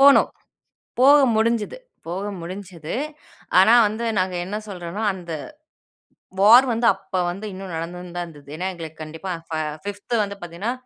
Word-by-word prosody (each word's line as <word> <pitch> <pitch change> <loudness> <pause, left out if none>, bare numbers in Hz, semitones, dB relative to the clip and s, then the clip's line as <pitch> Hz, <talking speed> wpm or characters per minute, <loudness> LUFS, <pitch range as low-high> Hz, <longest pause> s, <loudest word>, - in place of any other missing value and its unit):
போனோம். 280 0 +7 0.7
போக 280 +3 +8 0.2
முடிஞ்சது. 225 - +1 0.3
போக 190 +5 -3
முடிஞ்சது, 175 -2 -7 0.6
ஆனா 220 +5 +7
வந்து 220 +3 -3
நாங்க 185 0 0
என்ன 195 +4 -4
சொல்றோம்னா, 180 +1 -5
அந்த, 175 -3 -7 1.1
வார் 230 +6 +8
வந்து 230 +1 0
அப்ப 195 0 -10 0.2
வந்து 195 +4 -7
இன்னும் 190 -1 -7
நடந்துன்தான் 175 +1 -5
இருந்தது. 145 -4 -14
ஏன்னா 185 +3 -2
எங்களுக்கு 160 -2 -9
கண்டிப்பா 160 +5 -7
அ - - -14
ஃபா 160 -1 -2 0.3
5த் 205 +4 -3
வந்து 200 0 -5
பாத்தீங்கன்னா, 175 +7 -3
190 Hz, 145 wpm, -23 LUFS, 170-210 Hz, 1.1 s, போக